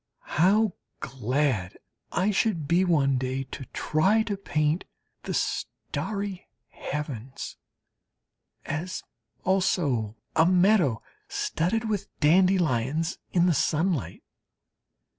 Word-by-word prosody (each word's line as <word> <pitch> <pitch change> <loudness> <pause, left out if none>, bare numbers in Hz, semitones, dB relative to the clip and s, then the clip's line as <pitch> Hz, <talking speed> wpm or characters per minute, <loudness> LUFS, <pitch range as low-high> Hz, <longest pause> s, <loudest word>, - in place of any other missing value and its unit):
How 205 +2 +4 0.3
glad 130 -6 -1 0.3
I 190 +4 +1
should 190 -7 0
be 175 +4 +4
one 140 -7 +3
day 130 +1 -2
to 135 0 -8
try 190 - +2
to 210 -2 -2
paint 155 -4 0 0.4
the - - -4
starry 200 -3 -3 0.2
heavens 135 -4 -5 1.1
as 160 +5 -4 0.4
also 145 - +1 0.2
a 160 +1 +5
meadow 180 - +4 0.2
studded 220 +8 -1
with 210 -3 -2
dandelions 160 -3 +2
in 175 -1 +3
the 180 - +4
sunlight. 160 - 0
165 Hz, 95 wpm, -27 LUFS, 135-190 Hz, 1.1 s, a